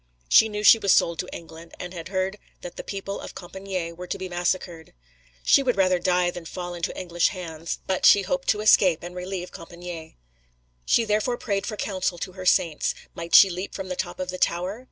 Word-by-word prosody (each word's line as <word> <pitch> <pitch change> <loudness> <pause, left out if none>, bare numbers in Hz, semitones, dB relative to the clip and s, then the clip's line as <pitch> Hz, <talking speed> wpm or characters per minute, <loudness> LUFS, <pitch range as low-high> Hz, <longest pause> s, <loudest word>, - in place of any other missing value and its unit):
She 220 - +6
knew 210 0 -4
she 225 - +8
was 200 -3 +2
sold 170 -1 +3
to 180 - -3
England, 165 0 -11
she 180 - -6
had 165 -1 -6
heard 190 +1 -2 0.2
that 175 -1 -8
the - - -7
people 195 0 -5
of - - -9
Compičgne 185 -2 -5
were 180 +1 -8
to - - -3
be 185 - -5
massacred. 175 -2 -3 0.5
She - - +5
would 250 -4 0
rather 185 -2 +3
die 180 0 +2
than 175 -1 -9
fall 175 +1 -6
into 170 -1 -4
English 175 -2 +1
hands, 165 -3 -5
but 190 -1 -1
she 200 - +7
hoped 270 +8 -2
to 210 - +2
escape 185 -6 +4
and 175 +1 -7
relieve 180 0 -5
Compičgne. 170 -1 -9 0.7
She 230 - +3
therefore 215 +3 0
prayed 200 -5 -2
for 215 - -4
counsel 185 -3 -2
to 185 - -5
her 185 0 -6
Saints; 165 -4 +2 0.2
might 170 0 -1
she 195 - +9
leap 180 +3 -5
from 190 -1 -5
the 185 - -3
top - - -4
of 185 -1 -3
the 185 - -6
tower? 180 +6 0
185 Hz, 215 wpm, -25 LUFS, 175-195 Hz, 0.7 s, she